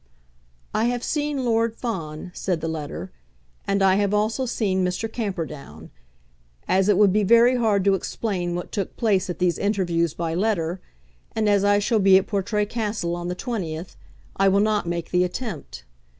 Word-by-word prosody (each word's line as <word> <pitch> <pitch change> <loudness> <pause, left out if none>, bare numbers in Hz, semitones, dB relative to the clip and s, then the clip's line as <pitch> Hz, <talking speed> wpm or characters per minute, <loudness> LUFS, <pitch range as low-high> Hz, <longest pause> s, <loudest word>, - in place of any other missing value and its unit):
"I 220 - +1
have 245 0 -1
seen 295 -3 -1
Lord 230 -1 +1
Fawn," 175 -9 -5
said 180 -3 -2
the 165 - -3
letter, 150 - -5 0.6
"and 200 0 +1
I 190 0 +5
have 205 0 +1
also 220 +5 0
seen 195 -5 0
Mr. 180 +5 -1
Camperdown. 155 - -5 0.8
As 190 +2 +2
it 205 - +4
would 200 -2 +5
be 210 - +3
very 235 +5 +5
hard 215 -5 +2
to 200 0 +4
explain 185 -2 -2
what 175 - -5
took 200 -4 -4
place 195 -5 +1
at 175 - -3
these 180 -1 +1
interviews 175 -5 0
by 165 -1 -2
letter, 180 -2 -1 0.5
and 220 -1 +1
as 200 -1 +3
I 205 0 +4
shall 215 +2 +1
be 195 -1 +6
at 190 - +1
Portray 210 +1 -1
Castle 210 -6 -2
on 175 0 -5
the 180 - -3
20th, 180 -7 -4 0.4
I 195 - +4
will 195 +1 +4
not 210 -3 +1
make 170 -1 -3
the 180 0 +3
attempt. 180 - -5
195 Hz, 180 wpm, -23 LUFS, 175-215 Hz, 0.8 s, be